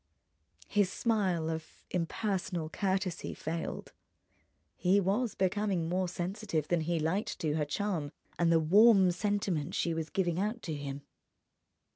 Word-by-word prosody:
His 205 -4 +2
smile 190 -9 +1
of 160 -1 -6
impersonal 180 -1 -2
courtesy 190 0 -1
failed. 165 +1 -4 0.8
He 190 +2 +3
was 205 +5 0
becoming 190 -2 0
more 180 +2 0
sensitive 175 -2 -2
than 175 -2 +2
he 165 +1 0
liked 175 +7 -1
to 155 -2 -1
her 150 -1 0
charm 165 -2 -2 0.3
and 170 -1 +4
the 165 - +5
warm 195 +3 +6
sentiment 185 -5 -1
she 170 - 0
was 160 -1 -3
giving 175 -2 0
out 215 +4 -2
to 160 - -3
him. 140 -1 -5
180 Hz, 135 wpm, -31 LUFS, 160-200 Hz, 0.8 s, warm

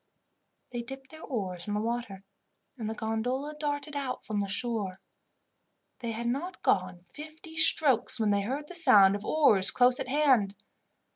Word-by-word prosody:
They 240 -1 -4
dipped 270 +3 -10
their 315 0 -13
oars 190 - -5
in 205 - -2
the - - -1
water, 225 -3 -4 0.5
and 225 -4 -5
the 220 - -5
gondola 245 +7 -3
darted 290 -1 -4
out 275 -3 -4
from 215 -2 -3
the 200 - -2
shore. 200 -2 -3 1.0
They 235 -2 -5
had 230 +1 -5
not 280 +10 -4
gone 185 -1 0
fifty 310 - -12
strokes 295 -7 +3
when 215 -2 +1
they 200 0 +1
heard 270 +8 -4
the 360 - -10
sound 200 - +7
of 205 - -6
oars 215 -12 +4
close 250 0 +3
at - - -4
hand. 255 -9 +2
240 Hz, 165 wpm, -28 LUFS, 205-285 Hz, 1.0 s, sound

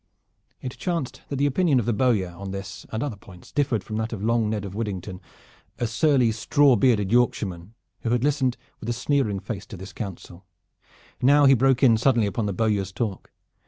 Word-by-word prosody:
It 125 - -6
chanced 170 -8 -3
that 140 - -3
the 140 +1 +1
opinion 145 -1 +2
of 115 - -2
the 120 - +1
bowyer 105 -6 +1
on 95 +3 -8
this 100 +1 -7
and 110 +2 -2
other 140 -7 -3
points 90 -2 -15
differed 130 -8 0
from 110 +2 -5
that 110 +1 -2
of 105 -3 -5
Long 115 -1 +1
Ned 105 -2 -2
of 95 - -7
Widdington, 95 -3 -5 0.6
a 120 - -1
surly 125 0 +3
straw 135 +4 +3
bearded 110 -7 +2
Yorkshireman, 105 -5 0 0.2
who 115 - -3
had 120 +1 +1
listened 135 -3 +1 0.2
with 110 - -6
a - - +1
sneering 120 -5 0
face 100 -1 -6
to 100 - -9
his 95 +2 -10
counsel. 95 -3 -8 0.8
Now 145 +3 +5
he 135 - +7
broke 130 +1 +3
in 115 -4 +6
suddenly 120 -2 +3
upon 105 +2 -2
the - - -1
bowyer's 100 -1 0
talk. 105 -2 -4
115 Hz, 195 wpm, -24 LUFS, 100-130 Hz, 0.8 s, he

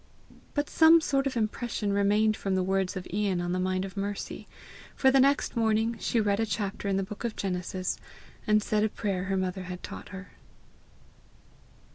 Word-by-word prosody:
But 290 0 0
some 325 +1 +6
sort 275 -3 0
of 255 - -3
impression 215 -1 -1
remained 210 +2 +3
from 195 -3 -2
the 185 - +1
words 190 0 0
of 180 - -6
Ian 200 -3 0
on 175 0 -2
the 185 - 0
mind 185 +1 0
of 195 - -9
Mercy, 200 0 -4 0.5
for 265 - +4
the 270 - +5
next 275 +1 +3
morning 225 0 +1
she 235 - 0
read 205 -1 +1
a 225 - +2
chapter 200 -1 -3
in 195 -1 +1
the 195 - 0
book 205 +4 -8
of 235 -2 -2
Genesis, 185 -1 -3 0.5
and 215 0 +4
said 215 -1 +1
a 215 - +2
prayer 195 -4 -2
her 195 0 -1
mother 185 0 -2
had 180 0 -7
taught - - -8
her. 195 0 -9
200 Hz, 190 wpm, -28 LUFS, 190-225 Hz, 0.5 s, some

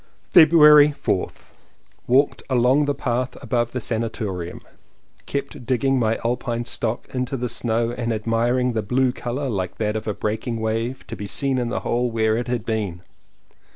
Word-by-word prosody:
February 150 -3 +7
4th. - - -2 0.6
Walked 135 +4 +3
along 130 +3 +3
the 145 0 -1
path 125 0 -2
above 120 -1 0
the 125 - -3
san 115 -1 -2
atorium. 95 -6 -5 0.7
Kept 140 -3 -5
digging 135 +1 +1
my 115 -1 +1
alpine 120 0 -1
stock 115 -1 -3
into 130 +1 -2
the 125 0 -2
snow 115 0 -1
and 120 -1 -3
admiring 115 +3 0
the 110 - 0
blue 125 +5 +1
colour 125 +2 -4
like 95 -6 -3
that 105 -1 -1
of 110 0 -4
a 105 - -1
breaking 110 +2 -3
wave 115 +3 -2
to - - -7
be 100 - -6
seen 130 +7 0
in 120 -1 -2
the - - -2
hole 120 +1 0
where 110 -1 +1
it 120 +2 -2
had 120 -2 -2
been. 100 -6 -3
120 Hz, 170 wpm, -22 LUFS, 110-130 Hz, 0.7 s, February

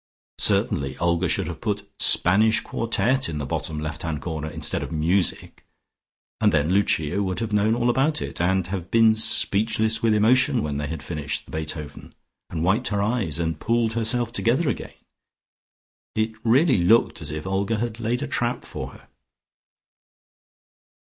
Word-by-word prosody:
Certainly 70 -2 +2
Olga 85 +1 0
should - - +1
have 80 0 -7
put 105 -2 -3
"Spanish 110 +5 +4
Quartet" 125 +3 0
in 80 - -4
the 75 - -3
bottom 75 +2 -3
left 75 0 -5
hand 80 -3 -3
corner 80 +1 -5
instead - - -2
of - - -6
"Music" 85 +4 -1 0.8
and - - +3
then 75 +2 +1
Lucia 95 -2 +1
would 95 -2 -2
have 110 -2 -3
known 105 +2 +2
all 120 0 0
about 135 +6 +1
it, - - -5
and 95 +1 +1
have 95 -1 -5
been 115 -1 +5
speechless 110 0 +2
with 115 -2 +2
emotion 125 +2 +3
when 75 -2 -3
they 75 0 -3
had 80 +2 -6
finished 75 -4 -4
the - - -15
Beethoven, 75 -2 -6 0.3
and 80 -2 -3
wiped 105 +8 +1
her 100 -1 -1
eyes, 105 - -1
and 80 -2 -2
pulled 115 -1 0
herself 115 +1 +1
together 130 +6 +1
again. - - -5 1.2
It 110 +1 0
really 130 - +3
looked 105 +7 +3
as 70 - -7
if 75 0 -6
Olga 100 +3 -1
had 115 0 -4
laid 120 +4 -2
a - - -3
trap 120 +1 -2
for - - -7
her.... - - -17
100 Hz, 165 wpm, -23 LUFS, 80-115 Hz, 1.2 s, been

